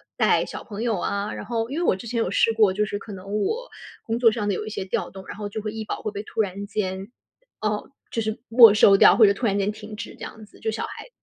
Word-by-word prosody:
带 - - +3
小 - - -8
朋 215 0 -6
友 230 -3 0
啊， 200 +1 -2
然 - - -6
后 230 -1 -2
因 275 - -4
为 345 - 0
我 185 - +2
之 235 - -9
前 235 +1 -3
有 225 - 0
试 225 - +3
过， 215 -4 +4
就 210 +2 0
是 205 - -4
可 210 - -10
能 200 +2 -4
我 - - -2 0.4
工 225 0 -1
作 230 -2 +6
上 210 -2 -3
的 205 - +1
有 210 - -3
一 - - -5
些 200 -3 -4
调 - - -2
动， 190 0 -11
然 - - -7
后 205 -1 -5
就 215 - -5
会 215 0 -4
医 220 -1 -4
保 - - -5
会 215 - -3
被 205 0 -5
突 220 - -8
然 200 -1 -1
间， 195 0 -4 0.5
呃 210 -1 -2 0.2
就 230 - -2
是 220 0 -3
没 230 -2 +8
收 205 -1 +6
掉， - - +7
或 225 - +8
者 200 - +5
突 235 - -4
然 200 -2 +1
间 200 +1 +1
停 210 0 -8
止 - - -6
这 - - -22
样 220 -1 -9
子， - - -20
就 220 - -1
小 220 - -3
孩 - - -9
子 - - -18
215 Hz, 320 characters per minute, -24 LUFS, 200-225 Hz, 0.5 s, 没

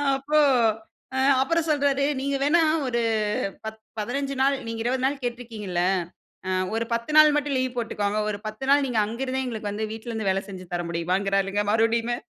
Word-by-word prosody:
அப்போ 295 +3 +1 1.0
அப்புறம் 330 +3 +1
சொல்றாரு 280 -2 +2 0.2
நீங்க 280 +1 -1
வேண்ணா 330 +4 +4 0.3
ஒரு 235 -1 0 0.6
பத் 220 0 -6 0.2
15 275 +5 -2
நாள் 275 0 +3
நீங்க 230 0 -4
20 255 +1 0
நாள் 280 0 -2
கேட்டு 240 0 -2
இருக்கிறீங்கில்ல. 210 -7 -4 0.6
அ - - -1 0.2
ஒரு 230 +1 0
10 235 +5 -2
நாள் 305 -1 +8
மட்டும் 290 -2 0
லீவ் 255 -1 -2
போட்டுக்கோங்க. 210 -3 -1
ஒரு 205 - -4
10 215 +5 -5
நாள் 285 0 +5
நீங்க 240 -4 -1
அங்க 230 +4 -6
இருந்தே 265 0 -2
எங்களுக்கு 220 -4 -4
வந்து 215 +1 -3
வீட்ல 225 +2 -7
இருந்து 220 -3 -2
வேலை 195 +1 0
செஞ்சு 185 -2 -8
தர 175 - -1
முடியுமாங்குறார்ங்க 195 +4 0
மறுபடியுமே. 230 +1 +2
235 Hz, 175 wpm, -25 LUFS, 210-275 Hz, 1.0 s, நாள்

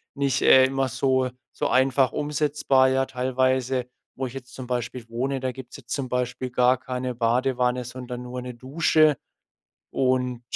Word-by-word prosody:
nicht, 140 -1 0
äh, 130 0 +7
immer 135 0 0
so 130 +1 +1 0.3
so - - 0
einfach 130 0 +3
umsetzbar, 145 -3 +2
ja 135 0 +1
teilweise. 130 0 0 0.3
Wo 130 0 -3
ich 125 - -10
jetzt 125 -1 -9
zum 130 -2 -8
Beispiel 120 -1 -4
wohne, 130 +4 -2
da 130 0 -2
gibt's 130 -1 -11
jetzt 125 -4 -17
zum 135 -3 -2
Beispiel 125 0 -2
gar 125 +1 +3
keine 125 0 -4
Badewanne, 125 +1 +1
sondern 125 0 -7
nur 125 0 -6
'ne 125 - -6
Dusche. 150 +2 +2 0.7
Und, 125 -2 0
130 Hz, 160 wpm, -25 LUFS, 125-135 Hz, 0.7 s, äh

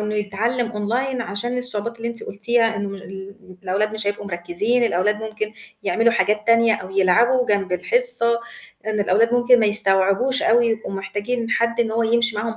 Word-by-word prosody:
إنه 210 0 -3
يتعلّم 225 +4 -2
Online 245 +5 -2
عشان 235 +3 -3
الصعوبات 235 -2 -3
اللي 230 0 -4
أنتِ 235 -1 -7
قُلتيها 225 +2 0
إنه 205 -1 -3
ال 195 0 -9 0.3
الأولاد 200 +3 -1
مش 215 -1 -4
هيبقوا 205 0 -3
مركّزين 195 +7 0
الأولاد 210 +2 0
ممكن 215 -1 -5 0.3
يعملوا 230 0 +2
حاجات 210 -2 0
تانية 230 -1 +4
أو 185 -2 -7
يلعبوا 230 +7 +3
جنب 195 -3 0
الحصة، 235 - +2 0.5
إن 215 -1 -1
الأولاد 225 +5 +2
ممكن 245 0 +4
ما 220 - +3
يستوعبوش 205 +6 +2
أوي 240 -5 +3
يبقوا 220 -2 -3
محتاجين 210 +4 -4
حد 235 0 +1
إن 230 -2 0
هو 230 +1 0
يمشي 235 0 +1
معاهم 225 +1 -3
220 Hz, 170 wpm, -21 LUFS, 205-235 Hz, 0.5 s, تانية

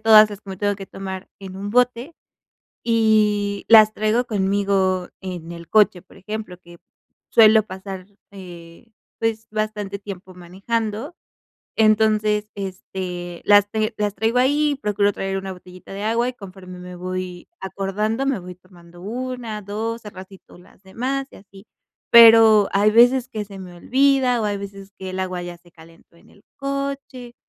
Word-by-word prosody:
todas 215 -1 +7
las 205 0 -8
que 195 - -11
me 190 - -6
tengo 205 0 -1
que 195 -1 -9
tomar 190 -1 -7
en 190 -1 -9
un 200 +1 -5
bote 250 +5 +1 0.7
y 210 -3 +1
las 215 -1 +8
traigo 215 +3 0
conmigo 195 -3 0
en 175 -3 -7
el 170 -1 -10
coche, 205 -4 +3
por 190 - -20
ejemplo, 210 -2 -7
que 175 -1 -16 0.5
suelo 220 -1 +6
pasar, 190 -1 -8 0.3
eh, 175 0 -12 0.3
pues 225 -1 -2
bastante 215 -2 -3
tiempo 190 -2 -9
manejando. 215 - -4 0.6
Entonces, 215 -1 +2
este, 185 -2 -6
las 205 0 +6
ten 215 0 -1
las 205 -1 -1
traigo 225 +4 0
ahí, 290 +2 +2
procuro 205 -1 +1
traer 195 0 -3
una 190 0 -6
botellita 180 +1 -13
de 200 +1 -6
agua 230 +2 +1
y 255 - -5
conforme 185 -3 -11
me 180 0 -10
voy 185 0 -6
acordando, 210 +6 -2
me 275 -7 0
voy 180 0 -9
tomando 175 -1 -18
una, 235 0 -5
dos, 220 +3 -4
al 210 - -9
ratito 190 -1 -14
las 180 +2 -21
demás 260 +8 -3
y - - -14
así. 195 +1 -17 0.4
Pero, 225 -3 +8
hay 205 +2 +4
veces 245 +3 +5
que 215 -1 -4
se 195 -1 -11
me 180 -2 -10
olvida, 260 +3 +2
o - - -1
hay 205 -1 -1
veces 195 0 -10
que 190 -1 -6
el 185 - -6
agua 185 -1 -3
ya 175 0 -7
se 175 0 -23
calentó 165 +1 -19
en - - -22
el 200 - -23
coche, 275 -3 -5
205 Hz, 165 wpm, -21 LUFS, 185-225 Hz, 0.7 s, las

